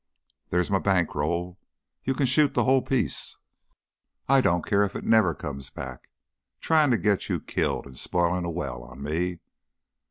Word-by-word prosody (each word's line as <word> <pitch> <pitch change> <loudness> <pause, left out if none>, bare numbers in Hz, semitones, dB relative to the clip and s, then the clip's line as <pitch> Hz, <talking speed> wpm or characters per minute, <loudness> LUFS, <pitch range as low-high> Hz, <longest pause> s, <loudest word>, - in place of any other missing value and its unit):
There's 90 +2 0
my 95 - +3
bank 95 -5 +1
roll 85 +5 -2 0.4
you 135 - 0
can 140 - +1
shoot 140 +3 +3
the - - +3
whole 130 0 +4
piece. 130 -2 -1 0.9
I 135 0 +5
don't 85 -8 +1
care 100 -1 +3
if 100 - -2
it - - -4
never 110 -8 +4
comes 70 -3 -6
back. 65 -2 -8 0.5
Tryin' 155 -3 +3
to 120 - +3
get 105 -3 0
you - - 0
killed! - - -2
An' 70 - -11
spoilin' 85 +6 0
a 85 - -2
well 70 -8 -4
on 60 +3 -11
me!" 85 +4 -2
90 Hz, 170 wpm, -26 LUFS, 75-115 Hz, 0.9 s, I